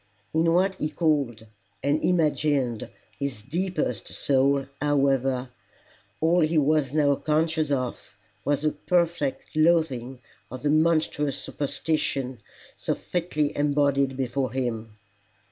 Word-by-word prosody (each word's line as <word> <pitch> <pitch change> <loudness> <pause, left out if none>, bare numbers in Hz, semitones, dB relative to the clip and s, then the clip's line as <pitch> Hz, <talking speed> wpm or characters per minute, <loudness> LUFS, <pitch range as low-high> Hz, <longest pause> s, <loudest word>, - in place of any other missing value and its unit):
In 165 +1 +3
what 185 +3 +3
he 150 - -1
called 145 -9 0 0.4
and 145 +2 +1
imagined 150 -8 +1 0.3
his 140 -7 -4
deepest 155 - -2
soul, 140 0 +2 0.2
however, 135 -3 +1 0.7
all 165 +3 +3
he 160 0 +2
was 150 -2 +2
now 145 -1 +3
conscious 155 +1 0
of 130 -3 -3 0.3
was 145 +1 0
a 155 - +3
perfect 170 -3 -1
loathing 155 -6 +2 0.3
of 130 +2 -8
the 145 - +2
monstrous 155 -2 +2
superstition 140 -3 -2 0.4
so - - -2
fitly 160 -4 -2
embodied 140 -2 +2
before 130 0 -1
him. 115 -4 -3
145 Hz, 110 wpm, -26 LUFS, 135-155 Hz, 0.7 s, In